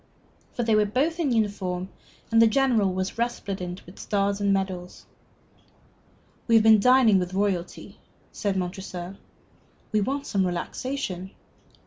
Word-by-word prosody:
For 240 - -2
they 225 -1 +1
were 210 -1 +3
both 295 +10 0
in 300 -6 +1
uniform, 195 -5 -1 0.4
and 225 0 +5
the 230 - +7
General 225 -5 +2
was 185 +4 -3
resplendent 195 -6 -3
with 180 - -14
stars 200 0 -1
and 200 0 +2
medals. 190 -2 -3 1.4
"We 230 - +4
have 220 - +6
been 220 -1 +7
dining 245 -3 +5
with 180 +1 -4
royalty." 190 -3 -2 0.3
said 200 -3 -2
Montresor. 185 0 -5 0.7
"We 215 -1 +2
want 275 +6 -2
some 195 -7 0
relaxation." 185 +1 -4
200 Hz, 135 wpm, -25 LUFS, 185-230 Hz, 1.4 s, the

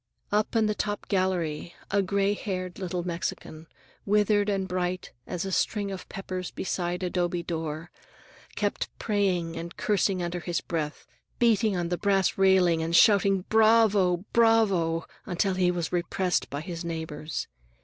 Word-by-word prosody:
Up 210 +3 +1
in 225 -1 +4
the 215 - +1
top 205 0 -3
gallery 175 -4 -1 0.2
a 200 0 +3
gray 200 +1 +1
haired 185 -3 -4
little 180 -2 -3
Mexican, 165 -2 -5 0.4
withered 210 0 +2
and 195 -2 0
bright 180 0 -2 0.2
as 180 0 -3
a 190 - -3
string 200 +2 0
of 190 - -7
peppers 185 -2 -5
beside 180 -1 -3
a'dobe 175 -1 -1
door, 160 -1 -4 0.6
kept - - -1
praying 185 -6 0
and 170 +1 -7
cursing 195 -3 +1
under 175 +1 -3
his 170 0 -2
breath, 155 -3 -4 0.3
beating 220 -4 +3
on 170 -1 -1
the 175 - -2
brass 195 -2 +2
railing 185 -4 +4
and 165 +1 0
shouting 195 -1 +5
"Bravó! 215 -5 +4
Bravó!" 200 -8 +3 0.2
until 190 +1 0
he 185 -1 +2
was 175 -2 -2
repressed 180 -2 0
by 140 +3 -4
his 170 0 -6
neighbors. 160 -2 -4
185 Hz, 150 wpm, -27 LUFS, 170-200 Hz, 0.6 s, shouting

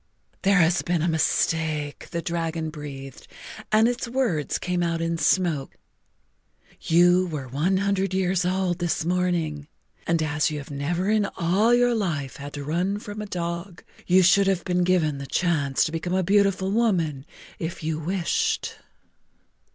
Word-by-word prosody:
"There 200 0 +3
has 170 0 +3
been 175 -3 -1
a - - +1
mistake," 160 -2 0
the 170 0 -4
dragon 165 -2 -2
breathed, 140 -4 -9 0.4
and 215 +1 +5
its 245 0 -2
words 235 - 0
came 180 -1 -2
out 170 -1 0
in 165 0 -1
smoke. 165 -8 +1 1.1
"You 175 +2 +4
were 150 -6 -5
one 155 +9 0
hundred 195 -1 0
years 185 -1 +1
old 180 -1 0
this 170 -2 -1
morning, 170 -5 -1 0.4
and 165 -1 +1
as 150 0 +1
you 155 - -4
have 145 0 -8
never 170 +8 -1
in 215 -2 +2
all 190 +7 +2
your 245 0 +4
life 160 - -2
had 140 +1 -8
to 145 - -5
run 175 +7 -1
from 210 0 -7
a 210 - -6
dog, 170 0 -5 0.2
you 185 +1 +5
should 195 +2 +5
have 190 -3 0
been 180 0 +1
given 165 -6 +1
the 140 - -7
chance 150 -7 +1
to - - -1
become 170 +3 -2
a 190 - +1
beautiful 195 0 +2
woman 175 - +1 0.4
if 165 0 -5
you 155 0 -2
wished." 195 - -1
175 Hz, 160 wpm, -24 LUFS, 155-190 Hz, 1.1 s, and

